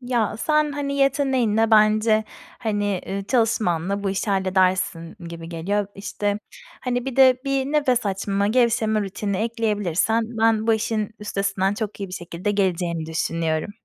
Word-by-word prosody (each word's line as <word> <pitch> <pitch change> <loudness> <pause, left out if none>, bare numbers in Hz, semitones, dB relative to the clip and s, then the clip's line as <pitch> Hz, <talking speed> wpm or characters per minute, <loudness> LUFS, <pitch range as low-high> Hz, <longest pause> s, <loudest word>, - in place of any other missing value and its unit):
Ya 240 -4 -1
sen, 305 +3 +1
hani, 280 -1 -3
yeteneğinle 260 -6 +2
bence, 215 0 +4 0.3
hani, 205 -4 -1
ııı, 195 +1 -3
çalışmanla 200 -6 +1
bu 195 - 0
işi 195 +2 -2
halledersin 185 -3 +1
gibi 165 -1 -8
geliyor. 195 +5 -1
İşte, 205 +1 -2 0.4
hani, 245 -1 -2
bir 270 -2 -5
de 260 -2 +6
bir 275 -1 0
nefes 275 -6 +1
açma, 200 +1 -1
gevşeme 225 -1 +2
rutini 200 0 -3
ekleyebilirsen 220 -2 0 0.2
ben 220 -1 +3
bu 225 - +4
işin 215 -1 -1
üstesinden 195 -1 -1
çok 215 -2 -5
iyi 195 - -4
bir 180 - -12
şekilde 175 +3 -4
geleceğini 175 -5 0
düşünüyorum. 160 0 -1
210 Hz, 145 wpm, -23 LUFS, 190-235 Hz, 0.4 s, de